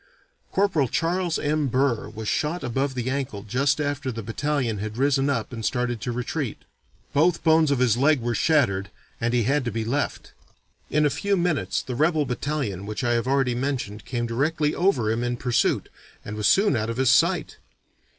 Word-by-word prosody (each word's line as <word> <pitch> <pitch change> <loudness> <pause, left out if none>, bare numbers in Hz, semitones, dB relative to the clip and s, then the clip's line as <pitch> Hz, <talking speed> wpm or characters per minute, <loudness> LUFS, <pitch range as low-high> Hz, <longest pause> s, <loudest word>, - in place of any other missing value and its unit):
Corporal 185 -9 +2
Charles 175 +4 0
M. 150 0 0
Burr 130 -4 0
was 110 0 -7
shot 155 +7 -1
above 135 +2 -1
the 125 -1 -3
ankle 130 -7 -3
just 135 +7 +1
after 145 -3 -2
the 115 -1 -6
battalion 125 -1 -1
had 110 +2 -5
risen 135 +1 +2
up 115 -3 -2
and 115 -1 -6
started 125 -2 -1
to 120 - -2
retreat. 125 +2 -3 0.6
Both 170 +4 +2
bones 160 -2 +4
of 140 - +2
his 120 -3 +3
leg 140 +2 +4
were 120 0 -1
shattered 100 - +2 0.3
and 115 +1 +1
he 120 -1 +2
had 140 +5 +1
to 120 - -1
be 110 +1 -3
left. 140 +5 -2 0.6
In 150 0 +2
a 145 - +2
few 200 +5 0
minutes 170 - 0
the 130 - -5
rebel 155 +3 +2
battalion 125 -7 -3
which 110 +4 -4
I 120 - +1
have 115 +1 0
already 135 -2 +2
mentioned 120 -5 -3
came 120 -1 -2
directly 150 +6 0
over 135 - +2
him 115 +2 -1
in 120 0 -1
pursuit, 125 -1 +1 0.4
and 105 - -5
was 105 -1 +1
soon 200 +1 +4
out 110 0 -1
of 115 - -3
his 130 -1 +4
sight. - - +2
130 Hz, 190 wpm, -24 LUFS, 115-150 Hz, 0.6 s, bones